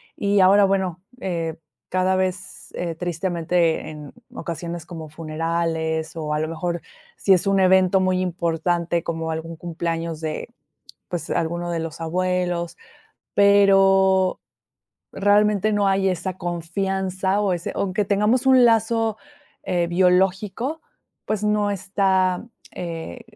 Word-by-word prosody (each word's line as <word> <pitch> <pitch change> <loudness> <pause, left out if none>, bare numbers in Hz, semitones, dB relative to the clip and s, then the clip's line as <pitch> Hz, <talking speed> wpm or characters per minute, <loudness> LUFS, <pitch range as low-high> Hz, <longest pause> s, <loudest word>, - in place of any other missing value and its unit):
y 200 0 +1
ahora 200 +2 +6
bueno, 190 -3 -1 0.2
eh, 165 -5 -3 0.3
cada 185 +1 +1
vez, 185 0 -3
eh, 170 -1 -3
tristemente 170 -1 0
en 150 -2 -10 0.2
ocasiones 170 -1 -5
como 165 -3 -8
funerales 160 0 -2
o 155 -2 -2
a 150 - 0
lo 155 - -1
mejor 170 +1 -3 0.4
si 195 - +4
es 185 +1 +2
un 195 0 +3
evento 190 0 +4
muy 185 0 +1
importante 170 -1 -1
como 165 -1 -3
algún 160 +1 -5
cumpleaños 165 -1 -3
de 155 -1 -4 0.6
pues 175 -2 -4
alguno 170 +1 -1
de 170 - -1
los 165 0 -6
abuelos, 175 0 -1 0.6
pero 195 -2 +4 0.7
realmente 210 +1 +3
no 205 -1 +2
hay 195 0 +2
esa 185 +1 -3
confianza 190 +2 -1
o 200 -3 +1
ese 175 0 -4
aunque 200 +2 0
tengamos 210 +6 +2
un 260 -2 +7
lazo, 225 -1 +2 0.5
eh, 175 -1 0
biológico, 190 - +1 0.4
pues 215 -1 -2
no 210 -1 +1
está, 190 -1 +1 0.3
eh, 170 +7 -6
180 Hz, 125 wpm, -22 LUFS, 165-195 Hz, 0.7 s, un